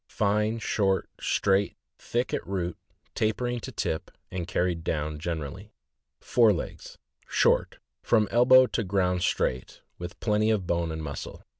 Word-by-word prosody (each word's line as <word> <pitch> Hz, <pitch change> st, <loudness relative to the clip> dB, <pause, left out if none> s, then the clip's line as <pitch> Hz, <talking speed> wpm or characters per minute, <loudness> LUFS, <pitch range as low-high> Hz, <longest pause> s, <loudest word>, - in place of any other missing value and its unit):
— -, -, -59 dB
Fine, 105 Hz, +2 st, +1 dB
short, 100 Hz, -4 st, 0 dB
straight, 100 Hz, +1 st, +1 dB, 0.2 s
thick 120 Hz, +2 st, -2 dB
at -, -, -2 dB
root, 90 Hz, -3 st, -2 dB, 0.4 s
tapering 120 Hz, +3 st, 0 dB
to -, -, -7 dB
tip, 80 Hz, -, -3 dB, 0.2 s
and 90 Hz, -2 st, -4 dB
carried 85 Hz, -2 st, 0 dB
down 75 Hz, -2 st, -2 dB
generally. 85 Hz, +4 st, -5 dB, 0.4 s
Fore 115 Hz, -3 st, +4 dB
legs. 90 Hz, -, -5 dB, 0.2 s
— -, -, -38 dB
Short, -, -, +2 dB, 0.2 s
from 110 Hz, -3 st, +3 dB
elbow 130 Hz, +2 st, +7 dB
to 115 Hz, -, -2 dB
ground 90 Hz, -2 st, +1 dB
straight, 65 Hz, -6 st, -1 dB, 0.2 s
with 85 Hz, 0 st, -7 dB
plenty 105 Hz, 0 st, +2 dB
of 105 Hz, -4 st, +1 dB
bone 85 Hz, -1 st, 0 dB
and 80 Hz, 0 st, -5 dB
muscle. 70 Hz, -2 st, -7 dB
95 Hz, 150 wpm, -27 LUFS, 85-110 Hz, 0.4 s, elbow